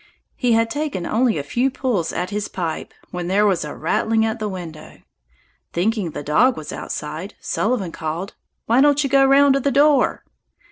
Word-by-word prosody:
He 245 Hz, -3 st, +1 dB
had 225 Hz, 0 st, +2 dB
taken 290 Hz, -, -3 dB
only 235 Hz, -2 st, +1 dB
a 145 Hz, -, -2 dB
few 240 Hz, -, 0 dB
pulls 245 Hz, -10 st, -1 dB
at 180 Hz, +2 st, -3 dB
his 205 Hz, 0 st, -2 dB
pipe 165 Hz, -4 st, -4 dB, 0.2 s
when 175 Hz, -1 st, -4 dB
there 200 Hz, +3 st, +3 dB
was 190 Hz, -5 st, +2 dB
a 150 Hz, -, -6 dB
rattling 220 Hz, +7 st, +1 dB
at 225 Hz, +1 st, -2 dB
the 215 Hz, -1 st, -2 dB
window. 170 Hz, -5 st, -8 dB, 0.8 s
Thinking 200 Hz, +1 st, 0 dB
the 145 Hz, -, -6 dB
dog 240 Hz, -, +3 dB
was 155 Hz, -, -6 dB
outside, 155 Hz, +7 st, -6 dB
Sullivan 210 Hz, -6 st, -1 dB
called, 165 Hz, +5 st, -5 dB, 0.3 s
"Why 235 Hz, +4 st, +3 dB
don't 290 Hz, 0 st, +4 dB
you 275 Hz, -, -1 dB
go 275 Hz, -1 st, +5 dB
round 275 Hz, +1 st, +5 dB
to 275 Hz, -, +2 dB
the 280 Hz, -, 0 dB
door?" 280 Hz, 0 st, +3 dB
215 Hz, 185 wpm, -21 LUFS, 175-260 Hz, 0.8 s, go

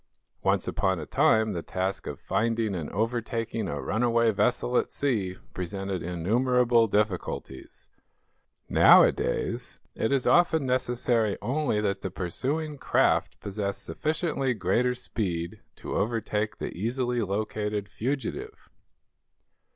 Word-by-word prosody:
Once -, -, +1 dB
upon 95 Hz, -2 st, 0 dB
a -, -, -5 dB
time 110 Hz, -1 st, +3 dB
the 85 Hz, -, -3 dB
task 95 Hz, +3 st, -3 dB
of -, -, -5 dB
finding 110 Hz, +2 st, 0 dB
and 85 Hz, -5 st, -4 dB
overtaking 115 Hz, 0 st, -2 dB
a 75 Hz, -4 st, -3 dB
runaway 115 Hz, -, +2 dB
vessel 120 Hz, +4 st, +1 dB
at -, -, +2 dB
sea 105 Hz, -10 st, -1 dB, 0.2 s
presented 95 Hz, 0 st, -4 dB
innumerable 115 Hz, +7 st, +2 dB
difficulties. 100 Hz, -10 st, -3 dB, 0.8 s
Nowadays, -, -, +4 dB
it 110 Hz, -, -1 dB
is 135 Hz, -2 st, +1 dB
often 160 Hz, -4 st, +4 dB
necessary 125 Hz, -4 st, +1 dB
only 130 Hz, 0 st, 0 dB
that 100 Hz, -2 st, -1 dB
the 95 Hz, -, -3 dB
pursuing 140 Hz, -, -3 dB
craft -, -, +2 dB
possess 100 Hz, 0 st, -3 dB
sufficiently 150 Hz, -5 st, -1 dB
greater 115 Hz, +6 st, +1 dB
speed 90 Hz, -9 st, -3 dB, 0.2 s
to -, -, -7 dB
overtake 110 Hz, -1 st, -1 dB
the -, -, -5 dB
easily 120 Hz, +4 st, -1 dB
located 105 Hz, 0 st, -2 dB
fugitive. 145 Hz, -, -4 dB
110 Hz, 115 wpm, -27 LUFS, 95-125 Hz, 0.8 s, Nowadays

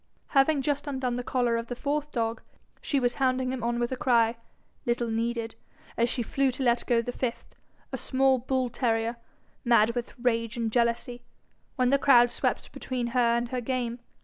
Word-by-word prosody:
Having 275 Hz, +1 st, +3 dB
just 290 Hz, 0 st, -1 dB
undone 260 Hz, -3 st, -2 dB
the 245 Hz, +1 st, -3 dB
collar 245 Hz, -2 st, +1 dB
of 230 Hz, 0 st, -4 dB
the 245 Hz, -, -4 dB
fourth 295 Hz, +3 st, -2 dB
dog, 225 Hz, -1 st, -2 dB, 0.4 s
she 280 Hz, -, 0 dB
was 245 Hz, -1 st, +1 dB
hounding 255 Hz, -1 st, +1 dB
him 255 Hz, -, -4 dB
on 235 Hz, 0 st, 0 dB
with 240 Hz, +1 st, -1 dB
a -, -, 0 dB
cry, 240 Hz, -4 st, +3 dB, 0.5 s
little 240 Hz, -1 st, 0 dB
needed, 230 Hz, 0 st, -2 dB, 0.4 s
as 235 Hz, +1 st, +2 dB
she 245 Hz, -1 st, -1 dB
flew 270 Hz, +4 st, +1 dB
to 260 Hz, +1 st, -3 dB
let 240 Hz, -1 st, +2 dB
go 235 Hz, -2 st, +3 dB
the 245 Hz, -, -3 dB
fifth, 245 Hz, -1 st, -4 dB, 0.4 s
a -, -, -4 dB
small 265 Hz, 0 st, +2 dB
bull 260 Hz, +1 st, 0 dB
terrier, 230 Hz, -1 st, -1 dB, 0.5 s
mad 235 Hz, -2 st, +4 dB
with 245 Hz, 0 st, -5 dB
rage 230 Hz, -2 st, 0 dB
and 230 Hz, -2 st, -1 dB
jealousy, 240 Hz, +1 st, 0 dB, 0.5 s
when 255 Hz, -2 st, +2 dB
the 280 Hz, +1 st, +3 dB
crowd 245 Hz, -3 st, +6 dB
swept -, -, -2 dB
between 250 Hz, -2 st, -3 dB
her 235 Hz, -2 st, +3 dB
and 235 Hz, 0 st, -2 dB
her 250 Hz, 0 st, -2 dB
game. 245 Hz, -1 st, -2 dB
245 Hz, 190 wpm, -27 LUFS, 235-260 Hz, 0.5 s, crowd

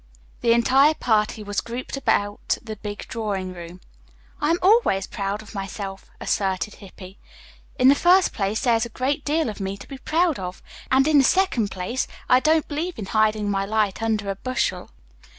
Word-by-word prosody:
The 230 Hz, -, +4 dB
entire 270 Hz, +6 st, +4 dB
party 215 Hz, -3 st, 0 dB
was 205 Hz, 0 st, -2 dB
grouped 240 Hz, +4 st, -6 dB
about 205 Hz, -6 st, 0 dB
the 220 Hz, -2 st, -7 dB
big 205 Hz, 0 st, -7 dB
drawing 195 Hz, -5 st, -3 dB
room. 175 Hz, +1 st, -10 dB, 0.6 s
"I 295 Hz, -, +1 dB
am 335 Hz, -, +3 dB
always 375 Hz, -, +4 dB
proud 200 Hz, +1 st, -4 dB
of 215 Hz, -, -13 dB
myself," 195 Hz, -1 st, -6 dB
asserted 195 Hz, +1 st, -1 dB
Hippy. 190 Hz, -1 st, -13 dB, 0.6 s
"In 255 Hz, -1 st, +4 dB
the 275 Hz, -, +8 dB
first 360 Hz, +5 st, +4 dB
place 200 Hz, +2 st, -1 dB
there 245 Hz, -4 st, +3 dB
is 225 Hz, +1 st, +1 dB
a -, -, -17 dB
great 260 Hz, +5 st, -2 dB
deal 310 Hz, +1 st, 0 dB
of 215 Hz, -, -5 dB
me 195 Hz, 0 st, -3 dB
to -, -, -12 dB
be 275 Hz, -, -9 dB
proud 325 Hz, -, +1 dB
of; 180 Hz, 0 st, -7 dB, 0.3 s
and 265 Hz, +2 st, +4 dB
in 305 Hz, -2 st, +5 dB
the -, -, +5 dB
second 265 Hz, -, +2 dB
place 190 Hz, +8 st, -3 dB, 0.2 s
I 250 Hz, -, +6 dB
don't 315 Hz, +2 st, +2 dB
believe 325 Hz, +4 st, -3 dB
in 210 Hz, -, -5 dB
hiding 215 Hz, -1 st, +2 dB
my 195 Hz, 0 st, 0 dB
light 210 Hz, 0 st, 0 dB
under 215 Hz, -3 st, 0 dB
a -, -, -4 dB
bushel." 255 Hz, +6 st, -2 dB
220 Hz, 185 wpm, -23 LUFS, 200-275 Hz, 0.6 s, the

